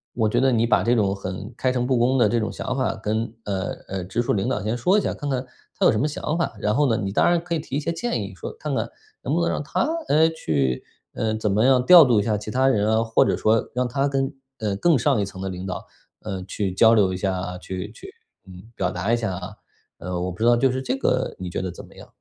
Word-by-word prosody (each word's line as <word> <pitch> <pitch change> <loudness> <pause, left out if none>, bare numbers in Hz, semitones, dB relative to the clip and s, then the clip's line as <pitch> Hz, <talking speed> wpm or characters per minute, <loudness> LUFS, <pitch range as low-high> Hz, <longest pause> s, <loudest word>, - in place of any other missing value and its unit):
我 115 -3 +2
觉 - - +1
得 135 0 +4
你 115 -1 +2
把 120 - +3
这 120 +4 +3
种 100 -4 +1
很 95 +3 -6
开 130 - +1
诚 125 -1 -1
布 130 -1 +2
公 125 +3 +2
的 120 - +4
这 120 - +1
种 110 - -2
想 130 - -4
法 130 - 0
跟， 110 +1 -2
呃， 95 -1 -2 0.2
呃， 95 -1 -3
直 95 +6 -1
属 120 - 0
领 100 -2 0
导 - - -1
先 110 +3 -1
说 180 - +3
一 - - -1
下， - - -2
看 145 - -5
看 130 -1 -1 0.3
他 - - +2
有 - - +7
什 105 - 0
么 145 - +1
想 150 +1 -3
法。 170 - -1
然 105 - +1
后 145 0 +3
呢， 115 - +2
你 95 - -2
当 100 - +3
然 175 0 +3
可 175 0 -4
以 165 - 0
提 150 -3 -6
一 - - +1
些 165 - -2
建 235 +9 -2
议， - - -7
说 - - -6
看 - - -5
看 - - -2 0.3
能 - - -1
不 - - +1
能 - - +1
让 - - -1
他， - - -2 0.3
哎， 160 +2 +4
去， 70 - -1 0.3
呃， 110 -1 -1
怎 110 -1 -1
么 105 +4 +3
样 130 -1 +4
调 175 -1 +9
度 120 -5 +3
一 - - -2
下 105 0 0
其 105 - -7
他 130 +4 +2
人 105 -5 +2
啊， 110 +1 +3
或 115 0 +3
者 - - +1
说 110 +1 +1
让 125 0 +1
他 135 +3 0
跟 135 -1 -1 0.3
呃， 105 -2 -1
更 165 +5 +3
上 135 -1 +2
一 - - 0
层 95 -1 -10
的 95 - -3
领 90 0 -6
导， 95 - -5 0.4
呃， 95 -1 -5
去 95 0 -3
交 110 +4 +6
流 95 -4 +3
一 - - -3
下， 95 -1 -2
去 95 +1 -6
去， 390 - -12 0.4
嗯， 90 0 -12
表 90 - 0
达 95 +5 -1
一 - - +3
下 110 -6 -2
啊。 95 +3 -7 0.4
呃， 90 +1 -4
我 90 +1 -2
不 90 - -10
知 115 - +1
道 120 0 +6
就 130 +2 +3
是 130 - -2
这 195 - -1
个 130 - 0
你 90 -1 -5
觉 - - -3
得 95 -1 -3
怎 85 - -11
么 - - -19
样？ - - -12
110 Hz, 310 characters per minute, -23 LUFS, 95-130 Hz, 0.4 s, 调